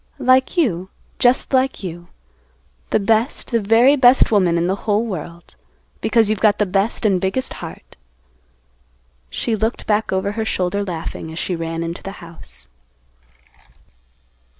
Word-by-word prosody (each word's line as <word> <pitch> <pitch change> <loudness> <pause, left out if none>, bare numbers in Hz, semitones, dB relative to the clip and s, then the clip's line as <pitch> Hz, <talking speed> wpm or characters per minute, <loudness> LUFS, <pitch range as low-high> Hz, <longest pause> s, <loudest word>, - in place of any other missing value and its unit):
"Like 260 +6 +2
you, 190 - 0 0.3
just 250 +2 +2
like 260 -3 +1
you; 175 -1 -7 0.8
the - - +2
best, 225 +7 0
the 230 - +2
very 225 +7 +4
best 255 -3 +5
woman 185 -5 +3
in 170 - 0
the 185 +2 0
whole 210 +3 +2
world, 175 -4 -8 0.4
because 225 -1 +2
you've 215 -1 -1
got 210 -1 +3
the 210 - +1
best 195 +5 0
and 190 -4 +2
biggest 195 +8 -1
heart." - - -10 1.3
She 225 - -2
looked 220 +2 -2
back 215 +1 0
over 190 +1 -1
her 220 +1 -3
shoulder 200 0 -1
laughing, 165 -3 -6
as 160 - -9
she 180 - -2
ran 165 0 -4
into 170 +1 -5
the 195 - -7
house. 165 - -14
205 Hz, 150 wpm, -19 LUFS, 175-230 Hz, 1.3 s, best